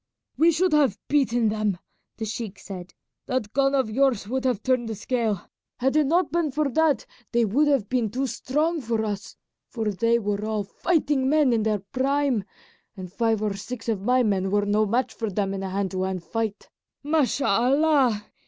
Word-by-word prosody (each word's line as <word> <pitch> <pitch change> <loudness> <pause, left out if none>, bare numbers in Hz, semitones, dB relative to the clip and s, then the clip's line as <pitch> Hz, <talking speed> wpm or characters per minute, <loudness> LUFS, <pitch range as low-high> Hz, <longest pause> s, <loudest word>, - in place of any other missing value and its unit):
"We 330 +2 +5
should 355 +2 +1
have 275 -9 +3
beaten 245 -6 +2
them," 210 -3 -1 0.4
the 225 - -3
sheik 215 -2 -5
said. 185 -2 -9 0.3
"That 230 -5 -2
gun 275 0 +2
of 265 -4 +2
yours 240 -2 +1
would 260 +3 -2
have 245 -5 0
turned 255 -3 +1
the 220 - -3
scale. 220 -3 -1 0.3
Had 265 +3 0
it 305 -2 +4
not 345 +1 +2
been 335 -2 +1
for 290 +1 0
that 295 -2 +2 0.3
they 235 -1 +3
would 275 +9 +2
have 275 -8 +2
been 245 -2 0
too 260 +6 -2
strong 305 +6 -1
for 225 -2 -1
us, 205 -1 -5 0.3
for 220 -3 -2
they 230 +4 +2
were 205 -2 -2
all 215 -1 -1
fighting 290 - 0
men 295 -4 +4
in 225 - +2
their 215 -1 +1
prime, 270 -4 +1 0.5
and 185 -1 -8
five 225 -2 +1
or 210 -2 0
six 225 +5 -7
of 210 -4 -1
my 250 +4 +3
men 195 -3 +1
were 205 +1 +1
no 210 +1 +2
match 240 +5 0
for 225 -2 -3
them 195 0 -1
in 195 - -4
a 190 - -3
hand 195 0 -2
to 185 -1 -2
hand 185 -2 -2
fight. 220 -1 -4 0.3
Mashallah! 270 -3 +2
235 Hz, 190 wpm, -25 LUFS, 205-275 Hz, 0.5 s, We